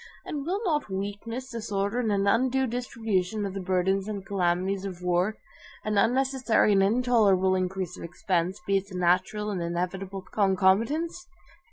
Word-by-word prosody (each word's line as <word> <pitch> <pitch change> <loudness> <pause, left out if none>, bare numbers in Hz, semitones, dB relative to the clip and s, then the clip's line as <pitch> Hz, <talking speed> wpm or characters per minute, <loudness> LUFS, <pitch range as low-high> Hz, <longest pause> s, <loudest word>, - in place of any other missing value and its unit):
And 290 -1 -4
will 380 +3 0
not 300 - 0
weakness, 205 +7 -5
disorder, 215 -1 -2
an 205 -4 +1
undue 260 +5 +2
distribution 220 -5 -2
of 195 - -4
the 195 - -4
burdens 190 +1 0
and 200 -3 -5
calamities 190 0 0
of 180 -3 -6
war, 180 +4 +1 0.5
an 215 0 0
unnecessary 255 -1 +2
and 195 -1 +4
intolerable 205 -4 +3
increase 185 -1 -2
of - - -8
expense, 180 +2 -1
be 195 0 +3
its 195 +1 -5
natural 185 +4 +1
and 185 -3 -3
inevitable 185 +3 -3
concomitants? 220 - +1
200 Hz, 145 wpm, -27 LUFS, 185-230 Hz, 0.5 s, and